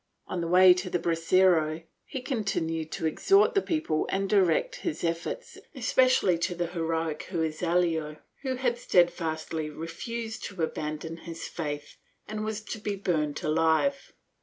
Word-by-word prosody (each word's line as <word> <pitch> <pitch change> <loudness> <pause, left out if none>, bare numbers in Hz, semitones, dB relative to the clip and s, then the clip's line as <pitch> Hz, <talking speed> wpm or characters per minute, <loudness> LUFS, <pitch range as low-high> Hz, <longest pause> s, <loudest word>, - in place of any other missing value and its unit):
On 180 - -3
the 170 - -2
way 180 +1 +8
to 180 +1 -4
the 175 - +1
brasero 165 -1 +2 0.2
he 265 - -5
continued 165 - -2
to - - -3
exhort 390 - +4
the 395 - +3
people 310 - -1
and 195 0 0
directed 210 - +2
his 340 - -3
efforts 170 - -3 0.2
especially 255 -7 +3
to 175 +1 -1
the 175 0 -1
heroic 165 -2 -2
Herrezuelo, 165 -2 0 0.2
who 260 -2 -2
had 245 -2 0
stedfastly 165 -4 +1
refused 220 +9 -5
to 190 -5 -4
abandon 155 +1 -3
his 165 0 -7
faith 145 -3 -5 0.3
and 215 0 -4
was 215 -1 -3
to 220 +1 -6
be 205 -1 -2
burnt 155 -7 -1
alive. 165 - +1
175 Hz, 145 wpm, -28 LUFS, 160-215 Hz, 0.3 s, way